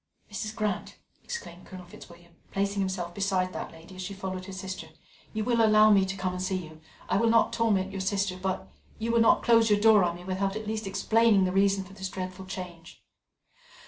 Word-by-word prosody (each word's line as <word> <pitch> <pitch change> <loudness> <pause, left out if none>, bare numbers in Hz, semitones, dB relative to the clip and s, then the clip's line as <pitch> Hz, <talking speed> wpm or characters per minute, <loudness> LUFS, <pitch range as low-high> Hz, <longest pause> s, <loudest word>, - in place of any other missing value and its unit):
"Mrs. 215 +1 -4
Grant!" 210 -4 -3 0.3
exclaimed 185 - -8
Colonel 185 -1 -10
Fitzwilliam, 170 0 -15 0.2
placing 200 +1 -1
himself 185 -3 -2
beside 190 -2 0
that - - -5
lady 165 +3 -14
as - - -6
she 195 +2 -5
followed 185 -1 -5
her 195 - -8
sister, 190 -3 -6 0.4
"you 215 -1 -2
will 235 0 +2
allow 215 0 +6
me 195 -2 +5
to 190 +1 -4
come 185 -1 -2
and 180 - -4
see 190 +1 -1
you? 155 -4 -7 0.3
I 185 - +1
will 230 +3 +3
not 230 0 +3
torment 200 -4 +1
your 195 -1 -4
sister, 195 -1 0
but 185 0 -3 0.3
you 230 +1 -2
will 235 0 +4
not 225 - +4
close 230 -1 +5
your 205 -1 +4
door 215 -2 +6
on 170 -1 0
me 175 - -11
without 190 +2 -2
at 220 0 -5
least 215 -1 -3
explaining 205 +1 +3
the 185 - +1
reason 195 0 +2
for 190 +1 -14
this 190 -1 -5
dreadful 185 0 -6
change?" 175 -3 -9
195 Hz, 210 wpm, -28 LUFS, 185-210 Hz, 0.4 s, allow